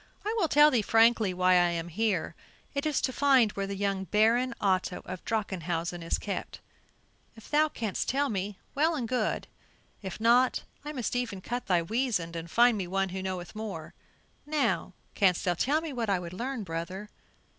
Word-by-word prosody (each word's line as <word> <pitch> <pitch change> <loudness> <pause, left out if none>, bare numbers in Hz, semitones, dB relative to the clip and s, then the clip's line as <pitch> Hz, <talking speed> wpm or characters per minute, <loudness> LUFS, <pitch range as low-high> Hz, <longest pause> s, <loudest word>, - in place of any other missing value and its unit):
I 430 - 0
will 345 - +2
tell 295 0 +6
thee 240 - +3
frankly 225 -1 +4
why 185 0 +2
I 175 -1 +5
am 170 0 -3
here; 200 -1 -1 0.4
it 280 +1 -1
is 300 - +1
to 260 - -1
find 265 -6 +4
where 195 -1 -3
the 200 - -4
young 195 -1 -1
Baron 235 +5 +2
Otto 185 -2 0
of 185 -1 -7
Drachenhausen 175 -5 -2
is 165 - -1
kept. 200 - -5 0.8
If 225 - -15
thou 305 +1 +4
canst 220 -8 -3
tell 280 +2 +1
me, 200 -3 -3 0.2
well 315 +4 +2
and 245 -6 -2
good; 250 +1 -1 0.6
if 190 -1 -6
not, 240 +3 +3 0.2
I 295 - -5
must 250 -5 -3
e'en 235 -6 -2
cut 245 +5 -4
thy 175 -3 +3
weasand 210 -5 -1
and 165 0 -6
find 235 +2 +4
me 185 - -3
one 195 +1 0
who 190 +1 -4
knoweth 185 -2 -5
more. 200 -8 -6 0.5
Now, 300 -1 0 0.2
canst 185 -4 +2
thou 180 - +2
tell 285 - +1
me 320 -3 -5
what 235 -4 -2
I 195 - +3
would 175 -1 -7
learn, 245 +3 -4
brother?" 185 +4 -5
210 Hz, 190 wpm, -29 LUFS, 185-250 Hz, 0.8 s, tell